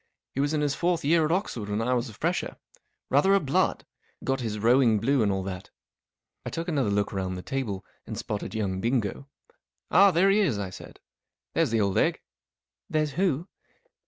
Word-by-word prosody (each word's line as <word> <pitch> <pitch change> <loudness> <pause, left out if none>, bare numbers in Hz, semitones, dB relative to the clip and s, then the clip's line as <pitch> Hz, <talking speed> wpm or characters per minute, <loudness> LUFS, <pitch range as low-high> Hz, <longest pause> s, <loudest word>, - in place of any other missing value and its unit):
He - - -4
was 145 +2 +1
in 150 - +1
his 145 -1 +1
fourth 170 0 0
year 160 +1 +4
at 155 - -1
Oxford 125 - -2
when 105 +1 -1
I 120 +3 +1
was 120 0 -1
a 110 - -12
fresher. - - -2 0.5
Rather 190 +9 +5
a - - +5
blood. 140 -6 0 0.4
Got 135 0 0
his 110 -4 -3
rowing 115 +1 +4
blue 135 +4 +2
and 105 -2 +2
all 95 -1 -1
that." 95 -1 -6 0.7
I - - -4
took 165 +1 -4
another 140 -10 +1
look 100 0 0
round 95 -1 -2
the 90 - -7
table, 110 -9 -3 0.2
and - - -5
spotted 105 +1 -4
young 95 -4 -1
Bingo. 120 +2 -1 0.3
" - - -50
Ah, 200 +1 +7
there 190 +2 +4
he 205 - +4
is," 160 - +2
I 100 -2 -4
said. - - -11 0.3
" - - -64
There's - - +2
the 115 -1 +1
old 100 -2 +1
egg*" - - +2 0.4
" - - -66
There's 155 -1 0
who 170 0 0
125 Hz, 210 wpm, -27 LUFS, 105-155 Hz, 0.7 s, Ah